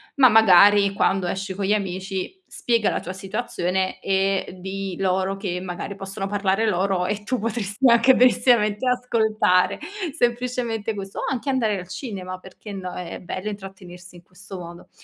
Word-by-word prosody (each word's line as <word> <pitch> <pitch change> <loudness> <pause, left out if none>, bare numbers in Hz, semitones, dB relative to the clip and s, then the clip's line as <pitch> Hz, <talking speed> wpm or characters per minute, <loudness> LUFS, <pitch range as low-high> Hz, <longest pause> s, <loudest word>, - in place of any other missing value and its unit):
ma 270 -2 +7
magari 205 -2 +6
quando 190 -1 +1
esci 190 +2 -3
con 200 - -3
gli 195 - +1
amici 190 - -3
spiega 230 -3 0
la - - -1
tua 185 - -6
situazione, 190 -2 -2
e 195 -1 0
dì 190 0 -5
loro 190 0 0
che 180 -3 -3
magari 185 +2 -6
possono 195 +1 -5
parlare 200 +1 0
loro 190 -2 +1
e 210 +2 -3
tu 255 +4 -2
potresti 225 +2 0
anche 235 +3 +6
benissiamente 240 -3 +3
ascoltare. 220 -7 +2 0.4
Semplicemente 240 -3 -1
questo. 195 -1 -7
O - - -3
anche 265 +1 -3
andare 225 -7 +1
al 180 - -9
cinema, 185 -2 -6
perché 195 +3 -11
no, 185 -2 -6
è 175 -2 -6
bello 185 +3 -5
intrattenersi 185 -3 -10
in 175 - -16
questo 185 +2 -11
modo. 170 0 -10
195 Hz, 160 wpm, -23 LUFS, 185-220 Hz, 0.4 s, ma